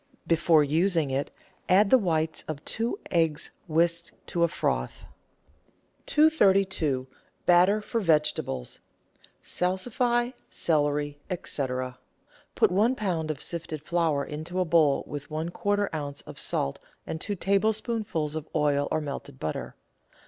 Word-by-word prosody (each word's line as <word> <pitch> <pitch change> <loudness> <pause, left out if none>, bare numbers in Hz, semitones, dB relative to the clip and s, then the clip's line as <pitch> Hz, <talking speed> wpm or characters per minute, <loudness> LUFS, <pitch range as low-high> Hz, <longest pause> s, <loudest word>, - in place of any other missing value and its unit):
Before 165 -2 +4
using 160 0 +1
it 135 +2 -1 0.4
add 195 +2 +5
the 260 - +9
whites 160 -5 0
of 155 -2 -6
two 230 - -1
eggs 165 -3 +1 0.2
whisked 170 +1 +1 0.2
to 170 - -1
a - - +5
froth. - - -2 1.0
232— 195 - +3 0.4
BATTER 180 +4 +5
FOR 225 +2 -2
VEGETABLES 150 - 0 0.6
(Salsify, 240 +7 0 0.2
Celery, 145 -2 0 0.3
&c.) 140 -2 +2 0.9
Put - - +4
one 215 +7 +3
lb. 175 -8 -2
of 150 -2 -4
sifted 160 -3 -4
flour 160 -4 +1
into 155 +5 -5
a 185 - +2
bowl 160 -4 +3
with 145 0 -7
one 160 +2 -3
quarter 205 +3 0
oz. 145 -2 -4
of - - -10
salt 70 - 0 0.3
and 160 - -5
two 205 - -2
tablespoonfuls 205 -4 0
of 155 -1 -5
oil 145 -2 +2
or 155 - 0
melted 140 -2 -6
butter. 80 - -4
165 Hz, 125 wpm, -27 LUFS, 150-195 Hz, 1.0 s, the